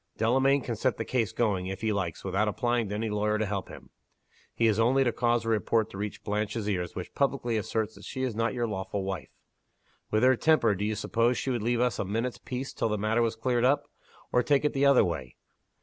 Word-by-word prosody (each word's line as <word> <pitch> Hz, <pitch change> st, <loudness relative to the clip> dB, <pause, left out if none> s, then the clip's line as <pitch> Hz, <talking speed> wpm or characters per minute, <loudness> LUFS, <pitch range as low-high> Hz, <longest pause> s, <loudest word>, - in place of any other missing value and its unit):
Delamayn 135 Hz, +5 st, +3 dB
can 120 Hz, -2 st, -3 dB
set 125 Hz, +3 st, 0 dB
the 115 Hz, -, -3 dB
case 115 Hz, -6 st, 0 dB
going, 100 Hz, -6 st, 0 dB
if 95 Hz, 0 st, -5 dB
he 110 Hz, -1 st, +1 dB
likes, 90 Hz, -5 st, -3 dB
without 95 Hz, +3 st, 0 dB
applying 120 Hz, +1 st, 0 dB
to 105 Hz, -, -3 dB
any 110 Hz, 0 st, -2 dB
lawyer 105 Hz, +1 st, +1 dB
to 110 Hz, -, 0 dB
help 100 Hz, -2 st, -3 dB
him. -, -, -12 dB, 0.6 s
He 115 Hz, -, +2 dB
has 110 Hz, -1 st, +3 dB
only 130 Hz, +4 st, +4 dB
to 120 Hz, -, +1 dB
cause 120 Hz, -1 st, +1 dB
a -, -, -1 dB
report 110 Hz, 0 st, +1 dB
to -, -, -8 dB
reach 105 Hz, 0 st, -5 dB
Blanche's 105 Hz, +1 st, -2 dB
ears 90 Hz, -4 st, -2 dB
which 90 Hz, -, -6 dB
publicly 135 Hz, -4 st, 0 dB
asserts 110 Hz, +1 st, -1 dB
that -, -, -15 dB
she 130 Hz, -, -4 dB
is 130 Hz, -3 st, -1 dB
not 115 Hz, +3 st, 0 dB
your 120 Hz, -1 st, 0 dB
lawful 100 Hz, -2 st, -3 dB
wife. 95 Hz, -1 st, -4 dB, 0.8 s
With 110 Hz, +2 st, +1 dB
her 130 Hz, 0 st, +6 dB
temper, 120 Hz, -6 st, +3 dB
do 100 Hz, +1 st, -2 dB
you 110 Hz, 0 st, -1 dB
suppose 115 Hz, +3 st, +1 dB
she 135 Hz, -, -2 dB
would 120 Hz, -3 st, -1 dB
leave 120 Hz, +2 st, +1 dB
us 125 Hz, -3 st, +1 dB
a -, -, +1 dB
minute's 115 Hz, +5 st, -2 dB
peace 130 Hz, +2 st, -5 dB
till -, -, -1 dB
the 105 Hz, -, 0 dB
matter 110 Hz, +3 st, +1 dB
was 115 Hz, -1 st, +1 dB
cleared 120 Hz, +1 st, 0 dB
up? 140 Hz, +3 st, +2 dB, 0.4 s
Or 125 Hz, -, +4 dB
take 145 Hz, +2 st, +2 dB
it 150 Hz, -, +1 dB
the 140 Hz, +1 st, +3 dB
other 140 Hz, -6 st, +6 dB
way. 75 Hz, -8 st, -4 dB
115 Hz, 240 wpm, -28 LUFS, 105-125 Hz, 0.8 s, her